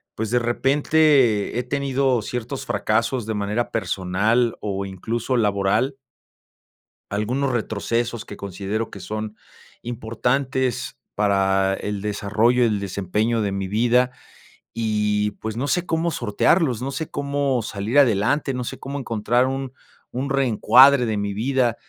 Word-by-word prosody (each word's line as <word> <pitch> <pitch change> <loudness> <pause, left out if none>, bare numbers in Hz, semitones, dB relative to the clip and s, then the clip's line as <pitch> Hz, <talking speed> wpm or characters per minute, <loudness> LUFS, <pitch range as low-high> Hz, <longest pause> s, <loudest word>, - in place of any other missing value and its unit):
pues, 110 0 -3
de 125 - +3
repente 135 -2 +2
he - - -1
tenido 135 -2 0
ciertos 125 +4 -5
fracasos 110 +4 0
de 110 - -2
manera 105 +3 -1
personal, 105 +4 0
o, 100 -1 -3
incluso, 115 +6 -3
laboral. 105 +4 +1 1.1
Algunos 125 +7 -1
retrocesos 115 0 -2
que 105 - -10
considero 100 +3 -4
que 100 - -9
son 110 +3 -5 0.5
importantes 125 +2 -2 0.2
para 95 -1 +2
el 105 0 -4
desarrollo, 105 +4 +1
el 110 -3 +1
desempeño 100 +4 -1
de 100 -2 -1
mi 95 -1 -3
vida. 120 +5 +2 0.6
Y, 105 -2 0
pues, 110 0 -4
no 135 +4 -1
sé 180 +3 0
cómo 165 0 0
sortearlos, 125 - +1
no 135 +2 -3
sé 150 +3 -4
cómo 140 -3 0
salir 110 +6 0
adelante, 130 +3 +2
no 125 -1 -3
sé - - -6
cómo 140 +1 -5
encontrar 120 0 +1
un 135 -1 -4 0.4
un 130 +3 -3
reencuadre 135 0 +5
de 110 -2 -1
mi 100 0 -2
vida. 120 +2 +1
115 Hz, 135 wpm, -22 LUFS, 105-130 Hz, 1.1 s, reencuadre